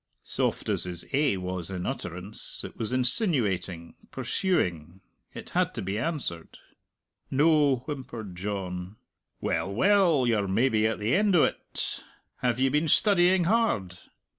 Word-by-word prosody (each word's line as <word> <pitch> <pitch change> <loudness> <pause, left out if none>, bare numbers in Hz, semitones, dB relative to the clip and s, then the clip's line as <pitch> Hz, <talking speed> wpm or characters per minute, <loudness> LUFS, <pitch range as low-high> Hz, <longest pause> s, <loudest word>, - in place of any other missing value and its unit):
Soft - - -2
as - - 0
his 90 -1 -6
"Eh" 140 -5 +2
was 90 -2 -5
in 90 -2 -4
utterance, 90 +4 -3
it - - -8
was 110 +1 -4
insinuating, 120 - +2 0.2
pursuing; 90 - -1 0.4
it - - -9
had - - 0
to - - -3
be 95 +3 -2
answered. 125 - -3 0.7
"No," 145 -3 +3
whimpered 120 - -7
John. 90 -1 -5 0.5
"Well, 95 - -1
well; 175 - +3
you're 110 -4 +1
maybe 110 +2 +2
at 110 - -2
the 105 +3 -1
end 200 -1 +3
o't! 165 - 0 0.3
Have 125 -1 -1
ye 135 0 +3
been 150 +4 +1
studying 185 +1 +4
hard?" 165 - 0
115 Hz, 135 wpm, -27 LUFS, 95-150 Hz, 0.7 s, studying